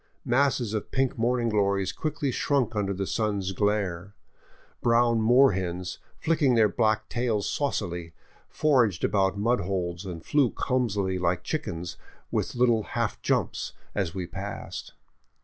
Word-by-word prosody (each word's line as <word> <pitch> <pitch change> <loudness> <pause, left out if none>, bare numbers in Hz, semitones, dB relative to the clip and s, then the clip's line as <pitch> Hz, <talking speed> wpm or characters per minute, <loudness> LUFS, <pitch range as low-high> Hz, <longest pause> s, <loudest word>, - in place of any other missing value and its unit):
Masses 125 -3 +2
of 110 - -3
pink 135 -1 0
morning 120 +1 +1
glories 100 -2 +1
quickly 150 -3 -2
shrunk 125 -3 0
under 100 -2 0
the 95 0 -2
sun's 100 -3 -1
glare; 100 -2 -1 0.7
brown 115 -1 +3
moor 125 +4 +6
hens, 90 -1 -3 0.2
flicking 155 -5 +2
their 110 -2 +5
black 110 0 +1
tails 115 -4 -1
saucily, 85 - -2 0.3
foraged 125 - +2
about 95 -1 +2
mud 115 +4 +2
holes 90 -1 -2
and 85 -4 -7
flew 145 -4 +3
clumsily, 105 -9 0
like 90 0 0
chickens, 90 - -4 0.3
with - - -1
little 120 -2 +3 0.2
half - - -1
jumps, - - -1 0.2
as 95 -4 -2
we 95 -2 -2
passed. 95 +3 -6
105 Hz, 135 wpm, -27 LUFS, 95-125 Hz, 0.7 s, moor